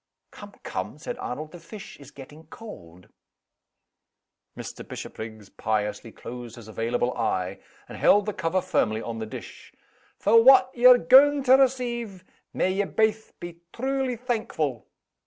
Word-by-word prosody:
"Come! - - -12
come!" - - -5
said - - -7
Arnold. 155 +5 -6
"The 175 - -11
fish 205 +3 -11
is 140 -2 -13
getting 150 +3 -14
cold." 90 - -12 1.5
Mr. - - -8
Bishopriggs 110 -2 -8
piously 105 +2 -3
closed 120 0 -9
his 115 -3 -12
available 115 +3 -1
eye, 95 -4 -2 0.3
and - - -10
held 205 -1 +4
the 210 - -3
cover 185 +1 -1
firmly 110 -12 0
on 115 -1 -5
the 110 - -5
dish. - - -10 0.5
"For 225 +3 +5
what 255 0 +7
ye're 250 +1 +7
gaun' 275 - +6
to 260 0 +5
receive, 240 -7 0 0.3
may 185 - 0
ye 200 +1 0
baith 220 +2 0
be 175 -1 -9
truly 265 0 -1
thankful!" 220 - -3
180 Hz, 140 wpm, -25 LUFS, -, 1.5 s, what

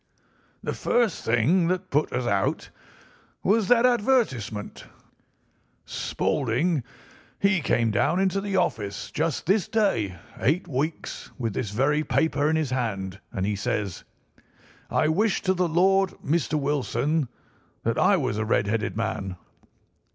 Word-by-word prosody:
"The - - -2
first 235 -6 +1
thing 140 +11 +3
that 185 +1 -2
put 150 +2 +1
us 125 0 -1
out 100 -3 0 0.7
was 210 0 +3
that 245 +2 +5
advertisement. 210 - 0 1.0
Spaulding, 140 +4 0 0.6
he 195 -3 +3
came 115 -4 +1
down 105 - +2
into 195 0 +1
the 200 -1 -3
office 110 - -1
just 155 -1 -1
this 195 +2 +2
day 150 - +1 0.2
eight 160 +8 +1
weeks, 150 +2 -3
with 115 -5 -2
this 105 - -2
very 140 +8 +1
paper 150 -2 +1
in 160 - +2
his 155 -5 0
hand, 100 -6 -2
and 95 - -2
he 105 0 0
says: 100 -1 -2 0.9
"'I - - +2
wish 205 +6 +1
to 190 - +2
the 180 -1 +1
Lord, 190 +3 +3 0.2
Mr. 155 +1 +1
Wilson, 145 +1 0 0.6
that - - 0
I - - +5
was 105 - -1
a - - +1
red 105 -1 +1
headed 105 +1 -1
man. 110 -4 -2
150 Hz, 135 wpm, -25 LUFS, 110-185 Hz, 1.0 s, that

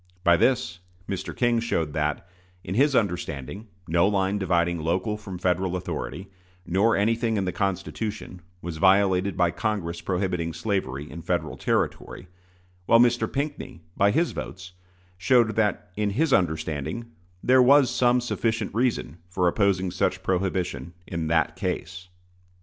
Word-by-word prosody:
By 85 -2 +6
this, 90 -5 +1 0.3
Mr. 95 -1 -4
King 120 -1 +2
showed 85 -10 -1
that, 75 +2 -2 0.4
in 90 - -5
his 135 +5 +3
understanding, 90 - -2 0.2
no 85 +3 +3
line 100 0 0
dividing 85 -2 +1
local 90 +6 -1
from 100 -3 -8
Federal 90 0 0
authority, 90 +1 -5 0.4
nor 100 +6 +2
anything 115 +2 +1
in 95 - 0
the 90 - -1
Constitution, 95 +1 -3 0.2
was 85 -2 -5
violated 95 +1 +3
by 90 -1 +3
Congress 85 -3 -3
prohibiting 90 -3 -2
slavery 80 -7 -2
in 85 - -7
Federal 85 -3 -2
territory; 90 - -2 0.6
while 115 - +6
Mr. 120 0 +3
Pinckney, 140 - -4
by 100 0 +4
his 165 +11 +1
votes, 95 -1 -7 0.5
showed 115 +1 +3
that, 105 -4 0
in 105 0 0
his 135 +8 +1
understanding, 80 - -1 0.3
there 130 +1 +5
was 135 0 +6
some 125 0 +3
sufficient 115 -3 -2
reason 115 - -1
for 90 -1 +1
opposing 95 0 +1
such - - -1
prohibition 90 -2 -2
in 85 -3 -3
that 80 0 +1
case. 90 -1 -4
95 Hz, 140 wpm, -25 LUFS, 85-110 Hz, 0.6 s, By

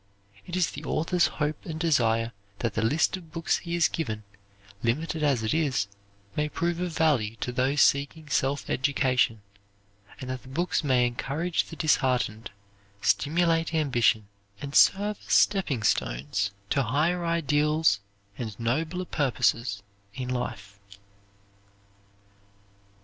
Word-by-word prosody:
It 175 - -4
is 185 -2 +1
the - - -8
author's 170 +2 +1
hope 150 0 -2
and 160 -1 -6
desire 115 -8 +2 0.3
that 115 -1 -2
the 110 - -1
list 150 +11 +2
of 165 -4 -14
books 165 +2 0
he 170 0 -4
has 170 -2 +4
given, 110 -10 -4 0.6
limited 155 +7 -1
as 140 -6 +2
it 110 - 0
is, 140 -10 +1 0.5
may 150 0 0
prove 170 +2 -1
of 180 -2 -3
value 125 -9 +2
to 125 - -4
those 130 +4 +1
seeking 145 +3 +1
self 140 0 0
education, 130 -5 +1 0.8
and 130 - -7
that 130 -1 -5
the - - -17
books 170 +5 -1
may 130 -4 +3
encourage 145 +8 -1
the 165 - -10
disheartened, 125 -7 +1 0.5
stimulate 165 - +2
ambition, 120 -8 +2 0.3
and 140 0 -6
serve 205 +4 +4
as - - 0
stepping 175 - +2
stones 75 - 0 0.2
to 140 - +3
higher 155 +8 +1
ideals 150 -6 +2 0.4
and 110 -4 -5
nobler 155 +10 -1
purposes 120 - 0 0.3
in 125 -1 -4
life. 105 -5 -4
140 Hz, 135 wpm, -27 LUFS, 115-165 Hz, 0.8 s, has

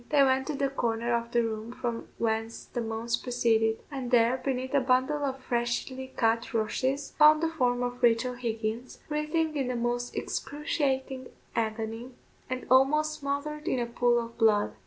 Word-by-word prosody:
They 290 -2 +5
went 265 0 +2
to 300 - -2
the 275 0 0
corner 235 -3 -1
of 235 0 -2
the 235 0 +3
room 220 0 -4
from 235 -2 -4
whence 225 0 -2
the 240 - -4
moans 230 +1 -2
proceeded, 225 -3 +1
and 265 -3 -4
there, 240 0 +4
beneath 260 -1 -2
a 285 - +5
bundle 260 +3 +1
of 270 -1 -3
freshly 245 +2 -2
cut 230 0 +1
rushes, 260 +6 -1
found 305 +1 +7
the 330 - +2
form 250 -6 +1
of 245 0 -4
Rachel 240 +1 +3
Higgins, 230 0 -4
writhing 305 +1 0
in 270 -3 0
the 250 - -2
most 240 +1 -2
excruciating 270 -3 -2 0.3
agony, 225 +2 -3 0.4
and 255 0 -3
almost 305 +4 +4
smothered 290 +2 -3
in - - +1
a 240 - 0
pool 240 0 +2
of 230 0 -7
blood. 215 -2 +3
245 Hz, 170 wpm, -28 LUFS, 230-275 Hz, 0.4 s, found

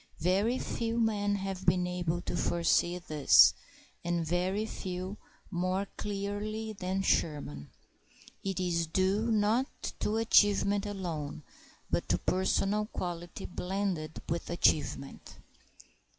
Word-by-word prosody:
Very 200 +8 +2
few 230 -2 -2
men 205 -3 +1
have 195 -1 -4
been 180 0 +4
able 175 -1 -2
to - - -3
foresee 175 +1 +2
this, 155 -5 +6 0.5
and 170 -1 0
very 185 +5 0
few 185 -1 -5 0.3
more 185 +2 0
clearly 210 +2 -3
than 190 0 -2
Sherman. 110 - 0 0.7
It 195 -1 -2
is 170 -2 0
due 190 +7 +1
not 220 +5 +2 0.3
to 215 - 0
achievement 205 -2 +4
alone, 165 -7 -4 0.5
but - - 0
to 90 - +3
personal 195 - +1
quality 175 -1 -5
blended 180 -4 -3
with 170 +1 -3
achievement. 150 -5 0
185 Hz, 110 wpm, -31 LUFS, 175-205 Hz, 0.7 s, this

